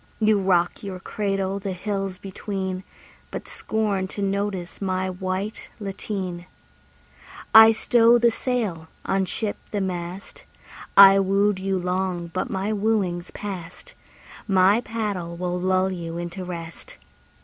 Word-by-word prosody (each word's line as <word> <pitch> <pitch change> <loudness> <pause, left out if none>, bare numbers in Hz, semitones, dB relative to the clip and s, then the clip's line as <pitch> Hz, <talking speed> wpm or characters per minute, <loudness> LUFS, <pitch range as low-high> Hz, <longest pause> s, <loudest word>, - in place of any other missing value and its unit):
You 215 -2 +4
rock 180 -2 +2
your 190 -2 -5
cradle 195 0 -2
the 195 -1 -4
hills 195 0 -3
between, 190 -1 -4 0.5
But - - -6
scorn 205 -4 -1
to 200 +1 -5
notice 195 -2 -2
my 185 -1 -1
white 185 +3 -4
lateen. 190 -3 -5 1.1
I 220 0 +10
stow 230 +1 +4
the 235 0 +4
sail, 220 -11 -2 0.2
unship 195 +2 -1
the 205 - -2
mast: 180 0 -5 0.5
I 195 0 +10
wooed 195 +1 +2
you 190 0 -1
long 180 -1 -2
but 185 - -2
my 195 +3 -1
wooing's 200 -5 0
past; 180 -4 -8 0.5
My 195 +3 +4
paddle 200 -7 -3
will 180 0 -2
lull 185 +1 +2
you 170 -2 -5
into 175 +2 -5
rest. 170 -2 -8
190 Hz, 125 wpm, -24 LUFS, 180-205 Hz, 1.1 s, I